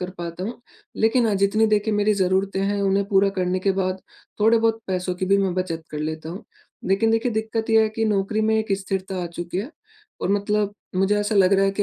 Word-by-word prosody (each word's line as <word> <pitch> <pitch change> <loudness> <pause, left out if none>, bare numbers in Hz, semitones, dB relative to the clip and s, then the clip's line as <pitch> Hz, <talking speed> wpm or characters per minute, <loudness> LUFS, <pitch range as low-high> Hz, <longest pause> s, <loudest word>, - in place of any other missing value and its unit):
कर 180 0 -4
पाता 170 +1 -5
हूँ, 240 +4 -6 0.4
लेकिन 225 +2 +3
हाँ 210 - +1
जितनी 200 +3 +3
देखिए 215 0 +1
मेरी 205 0 +2
ज़रूरतें 190 0 0
हैं 200 +1 0
उन्हें 195 0 +2
पूरा 195 0 +4
करने 180 0 0
के 195 0 +2
बाद 185 0 -2 0.4
थोड़े-बहुत 225 +1 +3
पैसों 185 -1 -2
की 185 +1 -3
भी 200 +1 +3
मैं 190 -2 0
बचत 175 -3 -3
कर 150 - -5
लेता 155 +1 -4
हूँ, 185 +5 -7 0.4
लेकिन 200 +4 +2
देखिए 225 +1 +1
दिक्कत 220 +1 -2
ये 220 0 +6
है 220 - +1
कि 225 - +1
नौकरी 210 +1 0
में 220 0 +2
एक 215 -2 -1
स्थिरता 190 -1 -3
आ 175 - -3
चुकी 175 +1 -5
है 235 +9 -4 0.5
और - - -1
मतलब 205 0 0 0.2
मुझे 195 +2 +2
ऐसा 205 +1 -1
लग 195 -1 +4
रहा 195 0 +3
है 195 - +2
कि 205 +1 0
195 Hz, 230 wpm, -23 LUFS, 185-215 Hz, 0.5 s, ये